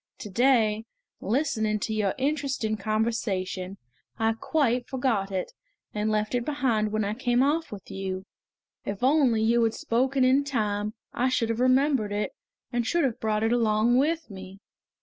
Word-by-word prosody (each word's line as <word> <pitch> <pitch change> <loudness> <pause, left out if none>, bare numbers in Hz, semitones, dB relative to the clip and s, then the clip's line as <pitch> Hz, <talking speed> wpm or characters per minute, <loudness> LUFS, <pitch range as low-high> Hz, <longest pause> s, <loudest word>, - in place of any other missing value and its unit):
To 210 -5 -8
day, 225 -2 +3 0.3
listening 220 -3 0
to 220 - -2
your 210 -3 0
interesting 270 -5 -1
conversation, 205 -3 -2 0.4
I 225 0 +2
quite 245 0 0
forgot 240 -7 -1
it, 185 -1 -3 0.4
and 210 +1 -1
left 215 +1 0
it 245 -1 +1
behind 240 -7 0
when 215 0 0
I 205 - -1
came 245 +1 +1
off 315 +4 0
with 200 -2 -9
you. 190 -1 -4 0.6
If 200 +3 -5
only 260 -5 +3
you 235 +1 +3
had 225 -1 +1
spoken 260 +3 +1
in 260 +2 +4
time 215 -5 -2 0.2
I 255 +2 +1
should 230 -3 0
have 230 0 -1
remembered 255 -3 +3
it, 205 +1 -1 0.4
and 240 0 +1
should 340 +8 +1
have 255 -5 -1
brought 215 -1 0
it 225 +1 +2
along 230 +1 +3
with 315 -2 0
me!" 190 0 -10
225 Hz, 165 wpm, -26 LUFS, 210-260 Hz, 0.6 s, in